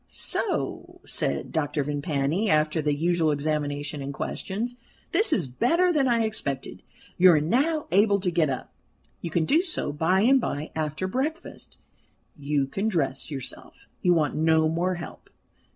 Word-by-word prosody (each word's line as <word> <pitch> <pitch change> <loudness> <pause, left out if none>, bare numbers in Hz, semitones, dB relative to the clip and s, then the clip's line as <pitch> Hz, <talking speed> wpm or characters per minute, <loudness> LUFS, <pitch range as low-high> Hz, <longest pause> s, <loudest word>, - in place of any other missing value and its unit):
"So," - - -2
said 70 0 -2
Dr. 150 -2 -1
Vimpany, 145 +6 -1
after 155 +1 +2
the 150 -1 +1
usual 165 +1 +1
examination 145 0 -2
and 140 +1 -4
questions, 220 - -4 0.3
"this 395 +3 +2
is 195 - +2
better 335 - +2
than 280 -4 +2
I 235 -2 +3
expected. 140 -12 -4 0.4
You 180 0 +8
are 155 - +4
now 280 - +1
able 200 +2 +4
to 180 -2 0
get 165 -3 +2
up. 130 - -5 0.5
You 170 - -4
can 160 0 +1
do 310 - +4
so 340 - -1
by 170 +6 +2
and 260 +4 +5
by, 150 -7 -3
after 155 +3 -2
breakfast; 300 - -4 0.6
you 145 -1 0
can 195 +10 -2
dress 160 -9 -1
yourself, 135 -4 -7 0.2
you 180 -1 +4
want 150 -4 +1
no 160 0 +3
more 175 +3 0
help. 175 - -9
160 Hz, 155 wpm, -26 LUFS, 145-215 Hz, 0.6 s, You